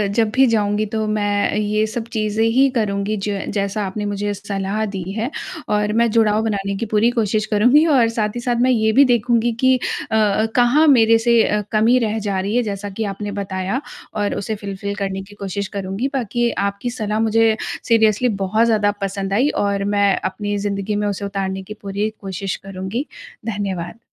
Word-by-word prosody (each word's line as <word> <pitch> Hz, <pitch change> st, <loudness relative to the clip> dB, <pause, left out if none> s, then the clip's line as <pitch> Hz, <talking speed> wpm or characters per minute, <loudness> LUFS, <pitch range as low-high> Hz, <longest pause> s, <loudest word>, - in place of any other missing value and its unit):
जब 225 Hz, -2 st, +3 dB
भी 265 Hz, -, +6 dB
जाऊँगी 210 Hz, -2 st, +1 dB
तो 220 Hz, +1 st, -2 dB
मैं 205 Hz, -1 st, +1 dB
अ, -, -, -4 dB
ये 215 Hz, +1 st, +1 dB
सब 225 Hz, +1 st, -4 dB
चीज़ें 215 Hz, 0 st, 0 dB
ही 265 Hz, +4 st, +4 dB
करूँगी 210 Hz, -1 st, 0 dB
ज 200 Hz, -2 st, -2 dB, 0.2 s
जैसा 200 Hz, +1 st, -1 dB
आपने 205 Hz, +2 st, -4 dB
मुझे 205 Hz, 0 st, -2 dB
सलाह 200 Hz, +1 st, -3 dB
दी 195 Hz, -3 st, -5 dB
है। 225 Hz, +4 st, -2 dB, 0.4 s
और 210 Hz, 0 st, +1 dB
मैं 230 Hz, +1 st, +3 dB
जुड़ाव 215 Hz, -2 st, +3 dB
बनाने 200 Hz, -2 st, -1 dB
की 230 Hz, -, -2 dB
पूरी 215 Hz, +2 st, +2 dB
कोशिश 215 Hz, -2 st, 0 dB
करूँगी 245 Hz, +9 st, +4 dB
और 265 Hz, -7 st, +4 dB
साथ 220 Hz, -2 st, -1 dB
ही -, -, -2 dB
साथ 240 Hz, 0 st, 0 dB
मैं 255 Hz, -, +4 dB
ये 220 Hz, -3 st, +2 dB
भी 280 Hz, +4 st, +6 dB
देखूँगी 240 Hz, -1 st, +2 dB
कि 260 Hz, 0 st, +4 dB, 0.4 s
अ, -, -, +1 dB
अ, 215 Hz, 0 st, +3 dB
कहाँ 255 Hz, +6 st, +4 dB
मेरे 230 Hz, -4 st, +6 dB
से 235 Hz, 0 st, +3 dB
अ, 210 Hz, 0 st, +1 dB
कमी 225 Hz, +3 st, +4 dB
रह 220 Hz, -1 st, -1 dB
जा 200 Hz, -2 st, -2 dB
रही 200 Hz, +4 st, -2 dB
है 245 Hz, -, +3 dB
जैसा 205 Hz, -1 st, -4 dB
कि 200 Hz, +3 st, -4 dB
आपने 205 Hz, +1 st, -5 dB
बताया 195 Hz, +4 st, -3 dB, 0.3 s
और 205 Hz, -1 st, -1 dB
उसे 215 Hz, +2 st, -3 dB
फुलफिल 200 Hz, 0 st, -5 dB
करने 195 Hz, -1 st, -3 dB
की 205 Hz, +2 st, -14 dB
कोशिश 200 Hz, 0 st, -3 dB
करूँगी। 195 Hz, +6 st, -2 dB
बाकी 240 Hz, -2 st, 0 dB, 0.2 s
आपकी 200 Hz, +4 st, -4 dB
सलाह 215 Hz, -3 st, -2 dB
मुझे 225 Hz, 0 st, +3 dB, 0.3 s
सीरियसली 225 Hz, +1 st, +3 dB
बहुत 215 Hz, +4 st, +2 dB
ज़्यादा 210 Hz, -3 st, +2 dB
पसंद 195 Hz, 0 st, -2 dB
आई 255 Hz, +8 st, +3 dB, 0.2 s
और 200 Hz, 0 st, 0 dB
मैं 200 Hz, -1 st, +3 dB
अपनी 205 Hz, +1 st, -2 dB
ज़िंदगी 200 Hz, 0 st, -2 dB
में 205 Hz, 0 st, 0 dB
उसे 200 Hz, 0 st, -3 dB
उतारने 195 Hz, -1 st, -3 dB
की 210 Hz, +3 st, -8 dB
पूरी 200 Hz, +2 st, -2 dB
कोशिश 195 Hz, -1 st, -4 dB
करूँगी। 195 Hz, +7 st, -4 dB, 0.4 s
धन्यवाद। 200 Hz, -2 st, -4 dB
210 Hz, 195 wpm, -20 LUFS, 200-225 Hz, 0.4 s, भी